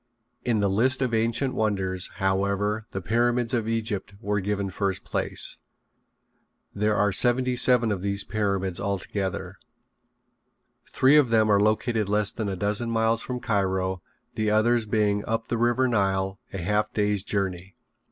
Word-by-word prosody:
In 115 -4 +1
the 100 - +2
list 120 +7 +2
of 125 -2 -2
ancient 115 +4 +1
wonders, 95 -4 -1
however, 100 +2 -1
the 95 - -6
Pyramids 120 +3 +1
of 115 -3 0
Egypt 110 -3 -3
were 105 -1 -1
given 100 0 -2
first 95 0 -2
place. - - -2 1.2
There 105 +1 0
are 105 0 +2
seventy 125 +5 +2
seven 125 -2 +4
of 95 -3 -2
these 100 0 -1
pyramids 100 -4 -1
altogether. 100 -1 -3 1.3
Three 135 +3 +4
of 140 -5 +4
them 110 -2 +3
are 100 0 +4
located 110 0 +1
less 105 0 +2
than 110 -3 -4
a 95 - -3
dozen 105 +5 -1
miles 115 0 +1
from 125 0 -4
Cairo, 95 -3 -1 0.3
the 110 -1 -1
others 110 +1 +2
being 105 -1 +1
up 115 0 -3
the 120 - 0
river 120 +2 +2
Nile 95 -4 0
a - - -5
half 105 +4 0
day's 105 -2 0
journey. 95 -2 -3
105 Hz, 150 wpm, -25 LUFS, 100-115 Hz, 1.3 s, seven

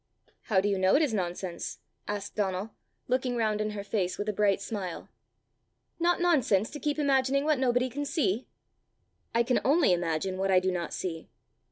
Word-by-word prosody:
"How 205 -5 +3
do 205 - 0
you 200 -2 +1
know 185 0 +4
it 315 - +4
is 275 -7 0
nonsense?" 180 -2 -3 0.3
asked 205 0 -4
Donald, 200 +1 -2 0.4
looking 255 0 0
round 215 -2 0
in 215 - -1
her 210 -1 -5
face 195 -3 -1
with 205 - -3
a - - 0
bright 200 -1 +2
smile. 190 -6 -5 0.9
"Not 345 +1 +2
nonsense 260 - +2
to 295 - -7
keep 295 +2 -1
imagining 275 -1 +2
what 305 -3 +2
nobody 250 -1 +2
can 285 +3 -4
see?" 265 - 0 0.9
"I 235 - +4
can 250 +1 +1
only 285 - +4
imagine 175 +2 -1
what 195 0 0
I 185 -1 +6
do 185 0 0
not 175 -2 -3
see." 165 -3 -5
210 Hz, 185 wpm, -29 LUFS, 190-260 Hz, 0.9 s, I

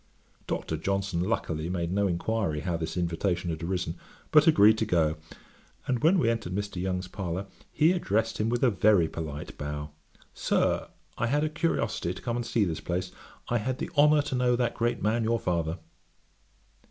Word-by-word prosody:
Dr. 80 - -2
Johnson 95 +1 -1
luckily 85 -5 -1
made 85 -2 -2
no 100 +1 +2
inquiry 90 -3 -1
how 85 0 -1
this 80 +2 -4
invitation 85 0 -1
had 80 - -5
arisen, 90 -1 -2 0.3
but 150 0 +6
agreed 110 -8 +6
to 110 - +1
go, 80 -5 +2 0.7
and 125 -2 -1
when 170 +5 +5
we 160 - +2
entered 110 -6 -1
Mr. 100 -3 -3
Young's 90 0 -2
parlour, 95 0 -4 0.3
he 155 +2 +4
addressed 115 - 0
him 110 +1 +1
with 120 +2 0
a 125 - +5
very 100 -5 +4
polite 75 -2 -6
bow, 75 0 -4 0.4
'Sir, - - 0 0.3
I - - +1
had 145 +5 +1
a 155 - +1
curiosity 120 - -1
to - - -9
come 120 - -1
and 120 -1 -2
see 115 - +2
this 80 -4 -3
place. 90 +1 -3 0.4
I 120 - +2
had 130 +4 -2
the - - -5
honour 150 0 +5
to 145 - -5
know 125 -1 +3
that 120 -1 0
great 120 -2 -1
man, 110 +2 +1
your 115 +1 +1
father.' 85 -2 -1
100 Hz, 185 wpm, -28 LUFS, 85-120 Hz, 0.7 s, but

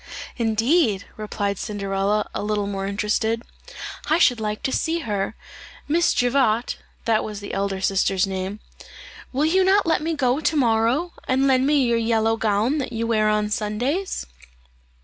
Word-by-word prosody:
"Indeed!" 225 - +2
replied 205 -2 -3
Cinderella, 200 0 -1
a - - -3
little 210 -1 -1
more 195 -1 -3
interested; 215 +3 0 0.7
"I 315 - +4
should 245 -8 +4
like 215 -1 -3
to 265 - 0
see 330 +4 0
her. 205 -4 -2 0.5
Miss 335 +3 +2
Javotte" 245 -2 +1 0.3
that 220 -2 +2
was 210 -2 -6
the 205 - -7
elder 195 -1 -2
sister's 195 0 +2
name 190 +2 -4 0.7
"will 275 +4 +1
you 375 +4 +3
not 390 +2 +4
let 330 - +2
me 325 +1 -1
go 260 -1 +1
to 315 0 0
morrow, 245 +6 +2
and 265 +1 +2
lend 265 0 +3
me 290 -2 +3
your 235 -1 +2
yellow 225 -1 +2
gown 225 +6 +1
that 255 - -3
you 230 0 -1
wear 215 -2 +2
on 210 0 0
Sundays?" 245 - -2
225 Hz, 160 wpm, -23 LUFS, 210-270 Hz, 0.7 s, I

